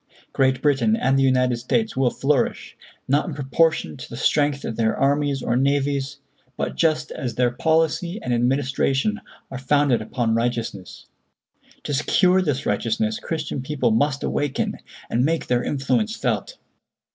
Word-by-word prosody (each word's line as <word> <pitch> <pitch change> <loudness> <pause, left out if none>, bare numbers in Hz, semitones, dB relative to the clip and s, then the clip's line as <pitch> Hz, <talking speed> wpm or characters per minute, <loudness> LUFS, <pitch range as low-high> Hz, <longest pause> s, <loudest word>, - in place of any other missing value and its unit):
Great 130 -1 +1
Britain 135 -7 +3
and 135 +3 +1
the 135 - +3
United 125 -2 +2
States 210 - -1
will 130 -2 +2
flourish, 140 +3 -1 0.3
not 145 +6 +2
in 165 - -5
proportion 145 - +1
to - - -10
the - - -7
strength 145 -1 +1
of 115 - -4
their 110 -1 0
armies 140 -1 +1
or 120 - 0
navies, 140 +1 0 0.4
but - - -3
just 155 -2 +1
as 120 -3 -4
their 125 -1 +2
policy 160 - 0
and 125 - -1
administration 135 - 0 0.3
are 135 - -5
founded 135 -2 +2
upon 115 +1 -1
righteousness; 115 -5 -3 0.8
to 145 - -3
secure 180 +6 +3
this 145 -5 -1
righteousness 220 0 -1
Christian 155 - -4
people 130 -3 0
must 140 +5 +1
awaken, 145 -2 -2 0.3
and 120 - 0
make 165 +3 0
their 125 0 0
influence 215 - 0
felt. - - -2
135 Hz, 150 wpm, -22 LUFS, 125-155 Hz, 0.8 s, Britain